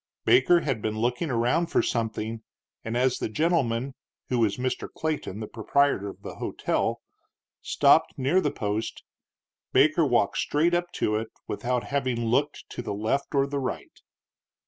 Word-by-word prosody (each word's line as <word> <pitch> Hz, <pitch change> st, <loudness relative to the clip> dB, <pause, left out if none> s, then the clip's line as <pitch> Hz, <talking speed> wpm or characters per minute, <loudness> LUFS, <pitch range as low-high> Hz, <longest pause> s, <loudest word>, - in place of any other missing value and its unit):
Baker 175 Hz, -, +5 dB
had 135 Hz, -9 st, -2 dB
been 110 Hz, 0 st, -2 dB
looking 125 Hz, +8 st, 0 dB
around 125 Hz, +8 st, +1 dB
for -, -, +2 dB
something, 110 Hz, -1 st, -2 dB, 0.4 s
and, 115 Hz, +2 st, -2 dB
as 125 Hz, 0 st, +2 dB
the -, -, -2 dB
gentleman 135 Hz, -2 st, 0 dB, 0.4 s
(who 125 Hz, -, +1 dB
was 110 Hz, -3 st, +2 dB
Mr. 130 Hz, 0 st, -2 dB
Clayton, 155 Hz, -, -3 dB
the 110 Hz, -, -4 dB
proprietor 115 Hz, -1 st, +1 dB
of -, -, -12 dB
the -, -, -8 dB
hotel) -, -, -1 dB, 0.6 s
stopped 145 Hz, +3 st, +4 dB
near 140 Hz, +8 st, +2 dB
the 150 Hz, -, +1 dB
post, 105 Hz, -2 st, -3 dB, 0.7 s
Baker -, -, +5 dB
walked -, -, +2 dB
straight 160 Hz, +4 st, +1 dB
up 175 Hz, 0 st, 0 dB
to 105 Hz, 0 st, 0 dB
it, 110 Hz, 0 st, -4 dB, 0.2 s
without 125 Hz, +3 st, -1 dB
having 130 Hz, -4 st, -1 dB
looked 130 Hz, +6 st, 0 dB
to -, -, -5 dB
the 110 Hz, -, -4 dB
left 125 Hz, +8 st, -1 dB
or 135 Hz, 0 st, +4 dB
the 140 Hz, 0 st, -3 dB
right. 130 Hz, -, -5 dB
125 Hz, 160 wpm, -26 LUFS, 110-145 Hz, 0.7 s, Baker